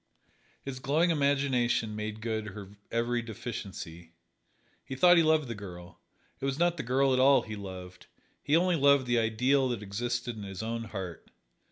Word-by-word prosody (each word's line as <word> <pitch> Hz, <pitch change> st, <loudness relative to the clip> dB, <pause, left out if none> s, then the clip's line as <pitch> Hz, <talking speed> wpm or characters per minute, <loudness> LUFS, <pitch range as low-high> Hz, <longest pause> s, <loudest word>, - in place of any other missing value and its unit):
His 135 Hz, -2 st, -6 dB
glowing 155 Hz, +7 st, +2 dB
imagination 135 Hz, -7 st, +1 dB
made 105 Hz, 0 st, -5 dB
good 110 Hz, -2 st, -2 dB
her 100 Hz, -1 st, -9 dB
every 120 Hz, +1 st, 0 dB
deficiency. 95 Hz, -7 st, -7 dB, 0.7 s
He 130 Hz, -, -6 dB
thought 175 Hz, +6 st, +6 dB
he 170 Hz, -, +6 dB
loved 155 Hz, -3 st, +3 dB
the 115 Hz, -, -4 dB
girl. 90 Hz, -4 st, -10 dB, 0.4 s
It -, -, -4 dB
was 135 Hz, 0 st, -1 dB
not 175 Hz, +1 st, +2 dB
the -, -, -2 dB
girl 135 Hz, +2 st, +2 dB
at 130 Hz, -, +2 dB
all 135 Hz, -1 st, +5 dB
he 110 Hz, -2 st, -6 dB
loved: 90 Hz, -2 st, -9 dB, 0.3 s
he 145 Hz, -, +2 dB
only 180 Hz, 0 st, +2 dB
loved 140 Hz, -2 st, +4 dB
the 120 Hz, -1 st, +2 dB
ideal 125 Hz, +4 st, +2 dB
that 115 Hz, -4 st, -3 dB
existed 120 Hz, +4 st, -3 dB
in -, -, -7 dB
his 95 Hz, 0 st, -6 dB
own 115 Hz, +1 st, -3 dB
heart. 95 Hz, -5 st, -7 dB
120 Hz, 175 wpm, -29 LUFS, 105-135 Hz, 0.7 s, thought